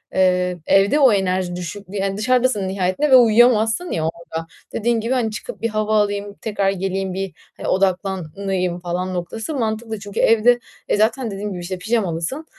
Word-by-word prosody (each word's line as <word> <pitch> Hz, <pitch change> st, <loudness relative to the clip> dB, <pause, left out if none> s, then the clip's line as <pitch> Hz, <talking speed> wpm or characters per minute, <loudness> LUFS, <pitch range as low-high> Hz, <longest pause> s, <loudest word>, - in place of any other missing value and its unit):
eee, 180 Hz, -1 st, +2 dB
evde 200 Hz, +9 st, +4 dB
o 260 Hz, -6 st, +6 dB
enerji 185 Hz, -2 st, 0 dB
düşük, 180 Hz, +3 st, -6 dB
yani, 195 Hz, 0 st, -2 dB
dışarıdasın 245 Hz, -3 st, +1 dB
nihayetinde 190 Hz, +9 st, 0 dB
ve -, -, +9 dB
uyuyamazsın, 235 Hz, +5 st, +4 dB
ya, 160 Hz, -, -1 dB
orada, 165 Hz, -1 st, -7 dB, 0.3 s
dediğin 230 Hz, +1 st, +1 dB
gibi, 230 Hz, +4 st, -1 dB
hani, 230 Hz, -4 st, 0 dB
çıkıp 215 Hz, -, -7 dB
bir 230 Hz, -, 0 dB
hava 215 Hz, 0 st, 0 dB
alayım, 205 Hz, 0 st, -3 dB
tekrar 200 Hz, -3 st, 0 dB
geleyim, 190 Hz, 0 st, -2 dB
bir, 195 Hz, -2 st, -4 dB, 0.2 s
hani, -, -, -5 dB
odaklanayım 185 Hz, -1 st, -1 dB
falan 180 Hz, +1 st, -3 dB
noktası 220 Hz, -, -4 dB
mantıklı 220 Hz, -2 st, -2 dB
çünkü 205 Hz, -1 st, -6 dB
evde, 235 Hz, +2 st, +4 dB, 0.3 s
e, -, -, +1 dB
zaten 225 Hz, +2 st, +1 dB
dediğim 205 Hz, +1 st, -4 dB
gibi, 180 Hz, -, -6 dB
işte, 185 Hz, +1 st, -4 dB
pijamalısın, 215 Hz, -, -2 dB
200 Hz, 165 wpm, -20 LUFS, 185-225 Hz, 0.3 s, ve